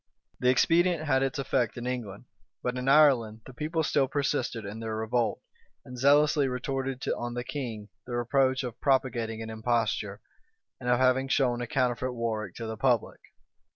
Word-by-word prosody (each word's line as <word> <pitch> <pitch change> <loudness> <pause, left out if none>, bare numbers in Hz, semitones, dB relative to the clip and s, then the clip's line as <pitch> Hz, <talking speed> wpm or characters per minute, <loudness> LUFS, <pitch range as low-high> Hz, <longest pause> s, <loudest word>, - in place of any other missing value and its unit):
The 125 - +3
expedient 170 +5 +3
had 130 -3 +2
its 135 0 -1
effect 125 -5 0
in 120 - -5
England: 120 -4 -5 0.4
but 125 0 -1
in 125 +1 -1
Ireland 130 -7 +4
the 130 - -11
people 155 +5 -2
still 140 -2 +2
persisted 130 -5 -1
in 105 +3 -6
their 110 -1 -4
revolt, 110 +1 -1 0.4
and 125 - -9
zealously 145 +2 +4
retorted 130 +1 -3
on 120 0 -5
the 120 - -3
king 120 -7 -5 0.2
the 120 - -4
reproach 130 +2 +1
of 120 -2 -7
propagating 120 -5 0
an 110 - -6
imposture, 110 0 -1 0.6
and 125 - -3
of 120 - +4
having 130 +1 +3
shown 125 -3 +1
a 120 - -3
counterfeit 125 -1 0
Warwick 110 -5 -3
to 115 - -6
the 110 0 -5
public. 120 -2 +1
125 Hz, 170 wpm, -28 LUFS, 115-135 Hz, 0.6 s, Ireland